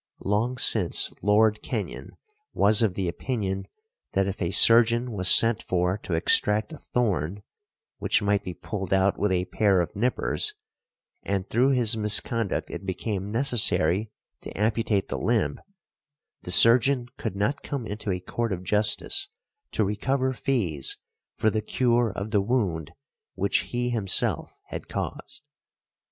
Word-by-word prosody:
Long 110 Hz, +6 st, -1 dB
since 105 Hz, -8 st, +4 dB
Lord 105 Hz, +1 st, +2 dB
Kenyon -, -, -6 dB, 0.4 s
was 105 Hz, +2 st, +4 dB
of 105 Hz, -5 st, +1 dB
the 95 Hz, -2 st, -2 dB
opinion 95 Hz, +1 st, -4 dB, 0.5 s
that 95 Hz, -, +1 dB
if 100 Hz, +1 st, -5 dB
a 85 Hz, -, -1 dB
surgeon 115 Hz, +4 st, +4 dB
was 95 Hz, -4 st, +1 dB
sent 115 Hz, -1 st, +7 dB
for 90 Hz, +2 st, -1 dB
to 90 Hz, -, -4 dB
extract 105 Hz, -, +1 dB
a 155 Hz, -, -10 dB
thorn, 100 Hz, -5 st, -2 dB, 0.6 s
which -, -, +1 dB
might 100 Hz, -1 st, 0 dB
be 90 Hz, -3 st, -8 dB
pulled 95 Hz, -3 st, -5 dB
out 95 Hz, +1 st, +1 dB
with 105 Hz, -1 st, 0 dB
a 90 Hz, -1 st, 0 dB
pair 100 Hz, -3 st, +1 dB
of 85 Hz, -, -3 dB
nippers, 125 Hz, -, -1 dB, 0.7 s
and 100 Hz, -1 st, -3 dB
through 130 Hz, +4 st, +2 dB
his 120 Hz, -3 st, +3 dB
misconduct 110 Hz, 0 st, +1 dB
it 85 Hz, -, -7 dB
became 95 Hz, +1 st, -4 dB
necessary 110 Hz, -, +2 dB, 0.3 s
to -, -, -8 dB
amputate 105 Hz, -1 st, -1 dB
the -, -, -4 dB
limb, 110 Hz, -11 st, -1 dB, 0.8 s
the -, -, -9 dB
surgeon 120 Hz, +6 st, +4 dB
could 110 Hz, -4 st, -5 dB
not 105 Hz, +8 st, -2 dB
come 140 Hz, -5 st, -5 dB
into 105 Hz, 0 st, -6 dB
a 90 Hz, -1 st, -1 dB
court 115 Hz, +5 st, -4 dB
of 90 Hz, -1 st, -4 dB
justice 105 Hz, -, +1 dB, 0.4 s
to 110 Hz, -, 0 dB
recover 130 Hz, +6 st, -1 dB
fees 105 Hz, -, -1 dB, 0.4 s
for 110 Hz, -1 st, +1 dB
the 110 Hz, -, -2 dB
cure 120 Hz, 0 st, 0 dB
of 100 Hz, +2 st, -5 dB
the 105 Hz, -3 st, +2 dB
wound 100 Hz, -, -2 dB, 0.4 s
which 100 Hz, +1 st, 0 dB
he 125 Hz, 0 st, -2 dB
himself 105 Hz, -5 st, 0 dB
had -, -, -7 dB
caused. 145 Hz, -, -6 dB
105 Hz, 145 wpm, -25 LUFS, 95-120 Hz, 0.8 s, sent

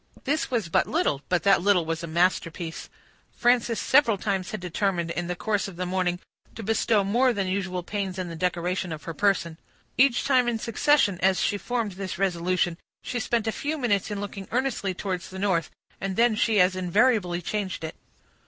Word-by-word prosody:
This 290 Hz, +3 st, 0 dB
was 230 Hz, -8 st, -1 dB
but 165 Hz, -, +2 dB
little, 140 Hz, -1 st, 0 dB
but 180 Hz, -2 st, +1 dB
that 195 Hz, -2 st, +5 dB
little 185 Hz, -3 st, +3 dB
was 165 Hz, 0 st, -2 dB
a 170 Hz, -, -5 dB
masterpiece. 170 Hz, 0 st, -1 dB, 0.5 s
Frances 240 Hz, -1 st, +2 dB
several 250 Hz, -7 st, +4 dB
times 190 Hz, -2 st, -2 dB
had 215 Hz, -, -4 dB
determined, 180 Hz, -1 st, -1 dB
in 175 Hz, 0 st, -3 dB
the 180 Hz, -, -2 dB
course 210 Hz, +2 st, -1 dB
of 195 Hz, -, -9 dB
the 180 Hz, +1 st, -3 dB
morning, 180 Hz, -1 st, 0 dB, 0.4 s
to 225 Hz, -, -7 dB
bestow 220 Hz, 0 st, +2 dB
more 240 Hz, +6 st, +3 dB
than 200 Hz, -3 st, -1 dB
usual 185 Hz, -1 st, -2 dB
pains 195 Hz, -1 st, -3 dB
in 185 Hz, -1 st, -3 dB
the 165 Hz, -, -6 dB
decoration 180 Hz, +1 st, -1 dB
of 155 Hz, -1 st, -6 dB
her 165 Hz, -, -5 dB
person. 170 Hz, -2 st, 0 dB, 0.4 s
Each 260 Hz, -2 st, +4 dB
time 255 Hz, -3 st, +3 dB
in 240 Hz, -1 st, 0 dB
succession, 230 Hz, -, +2 dB
as 190 Hz, 0 st, +3 dB
she 205 Hz, -2 st, 0 dB
formed 235 Hz, -3 st, -2 dB
this 185 Hz, -1 st, -5 dB
resolution, 180 Hz, -2 st, 0 dB, 0.2 s
she 245 Hz, -, -3 dB
spent 235 Hz, -1 st, 0 dB
a 220 Hz, -, 0 dB
few 300 Hz, +7 st, -3 dB
minutes 215 Hz, -8 st, 0 dB
in 205 Hz, -1 st, -3 dB
looking 200 Hz, -1 st, -6 dB
earnestly 240 Hz, -7 st, -1 dB
towards 185 Hz, -2 st, -4 dB
the 190 Hz, -, -9 dB
north, 185 Hz, -5 st, 0 dB, 0.3 s
and 195 Hz, -1 st, -2 dB
then 235 Hz, +1 st, +4 dB
she 215 Hz, -1 st, +2 dB
as 185 Hz, +1 st, +4 dB
invariably 185 Hz, 0 st, +2 dB
changed 195 Hz, -3 st, -3 dB
it. 160 Hz, -, -4 dB
195 Hz, 195 wpm, -26 LUFS, 180-225 Hz, 0.5 s, that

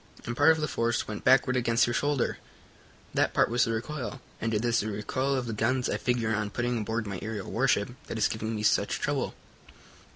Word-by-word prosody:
And 120 Hz, -, -3 dB
part 145 Hz, +5 st, +5 dB
of 160 Hz, 0 st, +4 dB
the 150 Hz, -, 0 dB
force 115 Hz, -3 st, 0 dB
went 105 Hz, -1 st, -6 dB
backward 130 Hz, 0 st, +4 dB
against 115 Hz, -1 st, +3 dB
your 120 Hz, -, -1 dB
shoulder. 145 Hz, 0 st, 0 dB, 0.7 s
That -, -, +1 dB
part -, -, +3 dB
was 120 Hz, +1 st, +3 dB
the 115 Hz, -, -1 dB
recoil, 130 Hz, +3 st, -4 dB, 0.2 s
and 115 Hz, -, 0 dB
it 110 Hz, +1 st, 0 dB
is 120 Hz, 0 st, +2 dB
the 110 Hz, -, -2 dB
recoil 130 Hz, +7 st, -1 dB
of 130 Hz, -2 st, -1 dB
the 115 Hz, -, -3 dB
guns 120 Hz, +4 st, +1 dB
I -, -, 0 dB
figure 120 Hz, -3 st, 0 dB
on 105 Hz, -1 st, -1 dB
putting 120 Hz, +3 st, -1 dB
aboard 110 Hz, +1 st, -2 dB
my 100 Hz, -3 st, -4 dB
aerial 110 Hz, -3 st, -5 dB
warship 120 Hz, -3 st, +1 dB, 0.2 s
that -, -, -4 dB
is 110 Hz, -, +3 dB
giving 110 Hz, 0 st, -3 dB
me 105 Hz, -, -3 dB
such 105 Hz, -, +2 dB
trouble." -, -, -1 dB
115 Hz, 220 wpm, -28 LUFS, 110-125 Hz, 0.7 s, part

